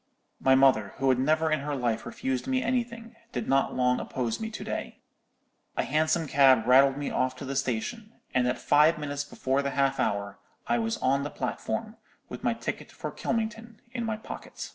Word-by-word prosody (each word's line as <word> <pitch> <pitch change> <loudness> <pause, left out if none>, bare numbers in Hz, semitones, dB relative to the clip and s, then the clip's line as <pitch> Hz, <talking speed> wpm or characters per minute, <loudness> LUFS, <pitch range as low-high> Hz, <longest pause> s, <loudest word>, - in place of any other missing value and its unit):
"My 130 0 +5
mother, 130 -7 +4
who 135 -1 +1
had 130 -1 +3
never 155 +4 +2
in 155 - +2
her 145 +1 -3
life 120 -4 -1
refused 130 +2 -3
me 260 -1 +1
anything, 235 -2 -2 0.2
did - - -3
not 135 0 +2
long 125 0 +2
oppose 120 -3 -3
me 220 0 -3
to 220 - -7
day. - - -5 0.8
A - - +2
hansom 155 +2 +1
cab 135 -4 +5
rattled 135 +2 +6
me 145 - -3
off 130 0 0
to 135 - -8
the 135 +1 -4
station; 140 - -2 0.2
and 125 -1 +2
at 125 - 0
five 150 +3 +4
minutes 145 -1 -3
before 135 -1 -1
the 140 - -1
half 135 0 +2
hour 100 0 -1 0.3
I 120 0 +1
was 115 0 -1
on 135 +2 +3
the 145 - -3
platform, - - -4 0.3
with - - -8
my - - +1
ticket - - -5
for - - -6
Kylmington 225 0 -3 0.2
in 235 -2 -3
my 220 -1 -2
pocket." 220 - -8
140 Hz, 195 wpm, -28 LUFS, 130-170 Hz, 0.8 s, rattled